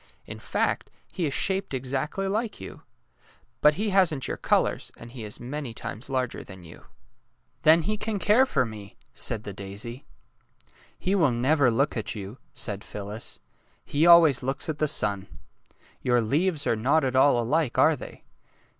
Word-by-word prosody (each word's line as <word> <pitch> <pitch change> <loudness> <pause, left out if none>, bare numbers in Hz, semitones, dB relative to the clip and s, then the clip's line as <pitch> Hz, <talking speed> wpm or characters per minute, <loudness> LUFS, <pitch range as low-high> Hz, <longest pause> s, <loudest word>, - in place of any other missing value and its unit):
In - - -8
fact, - - -1 0.2
he 175 -5 -1
is 140 - -3
shaped 190 -7 0
exactly 135 +9 -2
like 215 +2 -2
you. - - -9 0.8
But 150 0 +5
he 210 +2 -1
hasn't 175 -8 +3
your - - -2
colours, - - 0
and 120 - -11
he 120 -3 -8
is 105 -1 -5
many 130 -1 -6
times 115 +5 -7
larger 130 -2 -2
than 95 -2 -12
you." 85 - -14 0.4
'' - - -45
Then 160 +1 +6
he 215 +6 -1
can 210 0 -2
care 220 +7 +4
for 130 - +1
me," 110 -1 -10 0.2
said 110 -3 -2
the 100 - -6
daisy. 100 +6 -7 0.5
'' - - -25 0.3
He 190 - -1
will 170 -8 +4
never 130 +3 +3
look 135 +6 +1
at 110 0 -3
you," 100 +4 -8
said 100 -2 -3
Phyllis. 105 +2 -7 0.2
'' - - -38
He 155 +4 +4
always 165 -6 +7
looks 135 +2 -2
at 155 -1 -3
the 155 - +2
sun. 100 -9 0 0.7
Your 120 -1 +2
leaves 150 +7 +1
are - - +2
not 135 +9 +2
at 130 -1 -1
all 130 -1 +5
alike, 135 +3 0
are - - +5
they? - - -11
135 Hz, 180 wpm, -26 LUFS, 115-160 Hz, 0.8 s, always